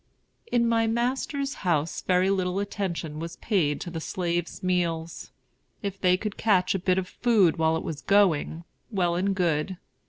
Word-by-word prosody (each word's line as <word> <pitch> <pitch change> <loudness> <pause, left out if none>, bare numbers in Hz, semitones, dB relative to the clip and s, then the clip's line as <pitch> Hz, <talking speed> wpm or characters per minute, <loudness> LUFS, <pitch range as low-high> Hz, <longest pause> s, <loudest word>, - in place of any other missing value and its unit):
In 235 -1 +3
my 225 -1 +2
master's 265 +4 -1
house 160 -4 0
very 185 +1 +2
little 185 -1 0
attention 185 -6 -3
was 165 +1 -6
paid 170 -10 0
to 175 - -5
the 165 -1 -5
slaves' 175 0 -3
meals. 170 -3 -1 0.5
If 195 -1 -4
they 180 -1 +4
could 210 +1 -5
catch 190 -4 +3
a 195 - -1
bit 185 +1 +1
of 185 -1 -1
food 215 -9 +3
while 160 0 +2
it - - -5
was 155 -2 -5
going, 175 -5 +2 0.3
well 180 -6 +1
and 190 +3 0
good. 175 0 0
185 Hz, 165 wpm, -26 LUFS, 170-200 Hz, 0.5 s, they